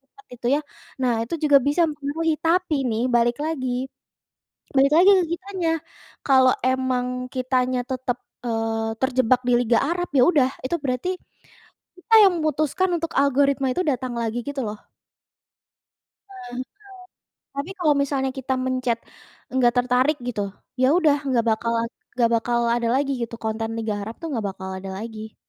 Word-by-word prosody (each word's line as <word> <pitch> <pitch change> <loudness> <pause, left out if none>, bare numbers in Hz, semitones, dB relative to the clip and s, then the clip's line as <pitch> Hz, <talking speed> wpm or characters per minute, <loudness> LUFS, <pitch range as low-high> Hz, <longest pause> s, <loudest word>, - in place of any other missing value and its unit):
lihat 410 +10 -23
itu, 240 0 -7
ya. - - -1 0.4
Nah, 250 - +3
itu 335 - -4
juga 290 -2 +7
bisa 290 +6 +2
mempengaruhi. 300 +2 -1
Tapi, 335 -1 +1
nih, 225 +1 -1
balik 240 0 +3
lagi. 305 -5 -2 1.1
Balik 275 +2 +5
lagi 370 +4 +7
ke - - +1
kitanya. 365 -1 -2 0.6
Kalau 260 -2 +6
emang 260 -1 +1 0.3
kitanya 255 0 0
tetap, 255 -1 -2 0.3
eee, 225 -1 -1
terjebak 255 -2 +2
di - - +4
Liga 235 -1 +3
Arab, 355 +1 -2
ya 250 - +6
udah, 275 -6 +3
itu 300 +7 0
berarti, 255 +7 -1 0.9
kita 445 +6 0
yang 385 - +6
memutuskan 310 +4 0
untuk 330 0 -4
algoritma 275 0 +2
itu 360 - -2
datang 255 -3 -1
lagi 230 0 -2
gitu 285 -1 -3
loh. 210 0 -6 1.5
Nah, 390 -1 -13
betul. 250 - -3 0.9
Tapi, 280 +5 -4
kalau 310 -4 +4
misalnya 270 -1 -1
kita 265 0 -2
mencet 255 -2 0 0.5
enggak 245 -2 +3
tertarik, 250 +4 +2
gitu. 210 -4 -2 0.4
Ya 255 - +5
udah, 310 -5 +4
nggak 240 -3 +1
bakalan 230 +1 0 0.3
nggak 235 -2 +3
bakal 235 +1 0 0.2
ada 240 -1 -1
lagi, 275 0 +1
gitu. 230 0 -4
Konten 220 0 -2
Liga 220 -1 -2
Arab, 220 +3 -6
tuh, 330 - -4
nggak 225 -6 -2
bakal 190 0 -7
ada 195 +1 -7
lagi. 220 0 -8
260 Hz, 155 wpm, -23 LUFS, 235-295 Hz, 1.5 s, juga